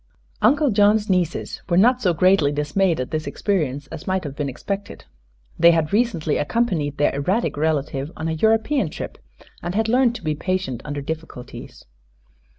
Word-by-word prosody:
Uncle 285 +5 +4
John's 205 0 +3
nieces 180 -3 -1
were 170 - +2
not 245 +6 +4
so 185 - +3
greatly 170 -3 +3
dismayed 150 +4 0
at 130 - -4
this 155 0 -3
experience 145 -9 -1
as 165 +1 -8
might 185 0 0
have 140 -3 -6
been 145 -1 -2
expected. 200 +9 -6 0.5
They 170 +1 +7
had 165 +1 0
recently 205 -9 +1
accompanied 155 - -1
their 145 - +2
erratic 180 +12 0
relative 145 -1 -1
on 160 - -3
a - - -1
European 220 - +2
trip - - -7 0.4
and 175 +2 -4
had 220 +1 +1
learned 245 0 +3
to 240 - -8
be 155 -1 0
patient 185 -6 -2
under 145 -1 -4
difficulties. 155 -4 -8
170 Hz, 165 wpm, -22 LUFS, 150-205 Hz, 0.5 s, They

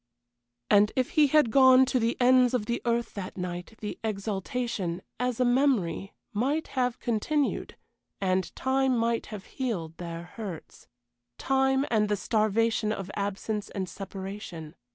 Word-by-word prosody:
And 205 +1 +5
if 255 -1 0
he 300 -1 +5
had 295 -4 +4
gone 260 0 +7
to 255 -1 +1
the 230 0 0
ends 250 0 +5
of 220 -4 -1
the 235 +2 -2
earth 235 0 0
that 195 -2 -6
night 180 +3 -5
the 210 - -5
exaltation, 205 -2 -3 0.2
as 250 -1 -1
a 250 - +3
memory, 245 - +1 0.2
might 275 +9 0
have 250 -2 0
continued, 270 +6 -1 0.4
and 185 -1 0
time 265 -1 +1
might 230 0 0
have 210 -3 -8
healed 185 - -4
their 170 -1 -6
hurts 180 -2 -9 0.5
time 265 0 +2
and 210 -2 +2
the 205 - +1
starvation 220 +2 +1
of 195 -2 -4
absence 205 +1 -3
and 190 -2 -4
separation. 190 -4 -7
220 Hz, 145 wpm, -28 LUFS, 195-255 Hz, 0.5 s, gone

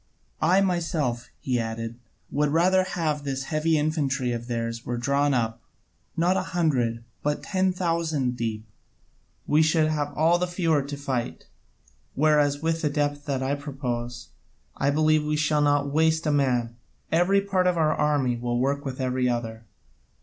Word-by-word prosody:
I 185 +3 +4
myself," 165 -10 -1
he 125 -2 0
added, 115 +1 -4 0.3
"would 150 0 +1
rather 185 +5 +3 0.4
this 135 -1 -3
heavy 155 +2 +1
infantry 145 -4 0
of 120 0 -4
theirs 115 -1 -3
were 120 - -3
drawn 140 +3 +1
up, 115 -1 -1 0.6
not 175 +3 +3
a - - +1 0.2
hundred, 120 -8 +1 0.2
but 150 0 -1
ten 190 -1 +1
thousand 165 -8 -1
deep: 110 -2 -3 0.8
we 150 +1 +3
should 155 0 +3
have 145 -2 -1
all 165 +3 +4
the 180 - 0
fewer 165 -4 +1
to 140 +1 -6
fight. 130 -4 -3 0.7
Whereas 150 0 +2
with 165 0 0
the 150 - +1
depth 145 0 -1
that 135 -2 -1
I 135 +2 0
propose, 125 -4 -4 0.5
I 140 - +1
believe 155 +1 +3
we 150 0 -1
shall 150 0 +2
not 145 -1 +2
waste 160 +1 +2
a 150 - +2
man: 125 -5 +1 0.3
every 180 +4 +4
part 195 -2 +1
of 180 -1 +2
our 155 -1 +3
army 140 -5 +1
will 120 0 -2
work 140 +2 0
with 135 -2 -5
every 130 -1 0
other. 115 -2 -3
145 Hz, 160 wpm, -25 LUFS, 125-160 Hz, 0.8 s, I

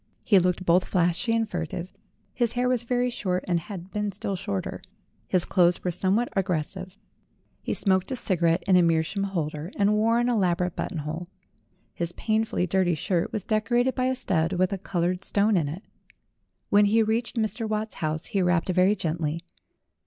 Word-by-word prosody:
He 200 -4 +5
looked 180 +1 0
both 180 +1 +4
flashy 175 +5 +1
and 225 -1 +1
furtive; 175 -1 -5 0.4
his 240 -2 0
hair 245 +1 +1
was 250 -2 +1
very 245 +1 0
short 185 -5 -2
and 175 -2 +2
had 185 +1 -9
been 210 -1 -2
still 195 0 -4
shorter; 100 - -4 0.5
his 180 -2 +2
clothes 175 -2 +3
were 180 - 0
somewhat 195 +8 0
aggres 180 -6 0
sive. 185 0 -9 0.6
He - - -2
smoked 190 +2 +1
a - - 0
cigarette 170 -7 +1
in 190 - +3
a - - +6
meerschaum 165 +4 +1
holder 155 -4 -3
and 205 +1 +3
wore 225 +2 +3
an 240 0 +2
elaborate 180 -6 +1
buttonhole. 160 +1 -4 0.7
His 170 0 -3
painfully 220 -4 0
dirty 180 -1 +1
shirt 170 +3 -1
was 210 - -3
decorated 240 +4 +1
by 255 - -1
a 260 0 +1
stud 180 -8 0
with 185 +2 +1
a 195 - -3
colored 180 0 -1
stone 205 +2 +2
in 155 -6 +1
it. 175 +8 -7 0.9
When 205 0 +6
he 220 +2 +4
reached 225 +3 -1
Mr. 220 0 -1
Watt's 215 0 -2
house 155 +1 -1
he 195 - -1
rapped 180 -1 +1
very 185 +3 +4
gently. 160 -3 -2
185 Hz, 180 wpm, -26 LUFS, 175-215 Hz, 0.9 s, a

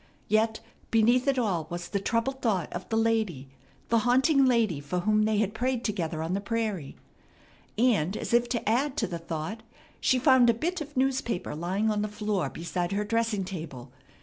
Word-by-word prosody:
Yet 220 +1 +1 0.3
beneath 240 +4 +3
it 275 -1 +2
all 185 -10 0
was 175 0 -5
the 200 - -1
troubled 245 +6 -1
thought 205 -7 0
of - - -6
the 225 - 0
lady, 220 -12 0 0.4
the 230 - +4
haunting 265 +4 +4
lady 225 - +2
for 175 +5 -3
whom 215 +2 +2
they 215 -1 +1
had 210 -1 0
prayed 250 +1 -1
together 165 -7 -2
on 165 +3 -2
the 200 - -1
prairie. 210 -9 -3 0.8
And 215 -6 +2
as - - -4
if 240 0 +3
to 235 -4 -2
add 260 +6 +1
to 225 - +1
the 170 -4 -5
thought 165 +6 -5 0.4
she 260 - +3
found 255 -2 +5
a 230 - +4
bit 345 +8 -2
of 295 -2 -8
newspaper 260 -7 0
lying 190 +7 0
on 210 -1 0
the 210 - -1
floor 210 -7 -2
beside 175 +4 -3
her 205 +1 0
dressing 225 -1 0
table. 155 -9 -7
215 Hz, 190 wpm, -28 LUFS, 180-240 Hz, 0.8 s, found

